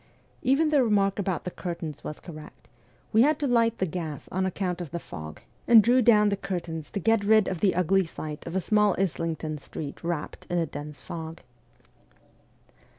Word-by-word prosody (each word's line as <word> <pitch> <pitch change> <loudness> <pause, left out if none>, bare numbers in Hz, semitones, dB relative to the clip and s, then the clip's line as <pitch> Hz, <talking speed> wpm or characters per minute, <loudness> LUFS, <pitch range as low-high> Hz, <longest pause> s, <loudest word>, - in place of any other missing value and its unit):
Even 285 +5 +3
the 290 -4 +4
remark 200 -3 +2
about 185 -5 -1
the 180 - -4
curtains 170 -5 -6
was 150 - -6
correct: 155 -6 -12 0.5
we 220 - +6
had 300 +5 +4
to 295 - -2
light 230 -3 +2
the 185 - 0
gas 160 -4 -5
on 190 +1 0
account 180 -1 -2
of 170 - -6
the 170 - -4
fog, 75 - -9 0.3
and 225 -3 +8
drew 250 +3 +4
down 210 -3 +5
the 200 - +1
curtains 175 -5 -5
to 200 - -3
get 225 +1 +2
rid 215 0 +4
of 185 - -2
the 195 -1 +2
ugly 190 +2 +3
sight 155 -1 -7
of 170 - -5
a - - +3
small 210 +1 +3
Islington 165 -4 -2
street 145 +2 -8
wrapped 170 -3 -4
in 175 - 0
a 170 - +2
dense 150 -1 -8
fog. 165 0 -7
185 Hz, 190 wpm, -27 LUFS, 160-210 Hz, 0.5 s, and